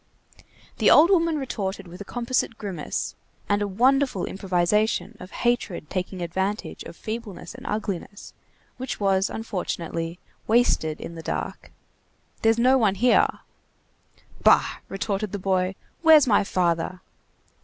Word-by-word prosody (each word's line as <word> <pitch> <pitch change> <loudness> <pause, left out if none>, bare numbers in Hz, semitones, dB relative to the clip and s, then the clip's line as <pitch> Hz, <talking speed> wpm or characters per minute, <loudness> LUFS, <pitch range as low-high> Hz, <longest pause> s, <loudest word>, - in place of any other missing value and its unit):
The - - +5
old 330 +5 +7
woman 335 -4 +3
retorted 200 -8 -4
with 180 +3 -11
a - - -6
composite 240 -1 -1
grimace, 185 -7 -4 0.3
and 205 0 +1
a 205 - 0
wonderful 250 0 +2
improvisation 195 +4 0
of 180 - -9
hatred 220 -11 -1
taking 185 -1 -3
advantage 190 +5 -3
of - - -9
feebleness 220 -1 -6
and 255 +4 -10
ugliness, 205 -1 -4 0.4
which 260 +1 -5
was, 195 -1 +2
unfortunately, 170 -5 -4 0.3
wasted 215 -9 +2
in - - -7
the 165 - -8
dark:— - - -5 0.7
"There's 225 0 +3
no 255 +3 +4
one 205 -4 +2
here." 245 +4 +4 1.2
"Bah!" - - +5
retorted 200 +1 -3
the - - -1
boy, 185 -1 0 0.3
"where's 315 -3 +7
my 210 -5 +4
father?" 180 -1 0
205 Hz, 130 wpm, -25 LUFS, 185-235 Hz, 1.2 s, old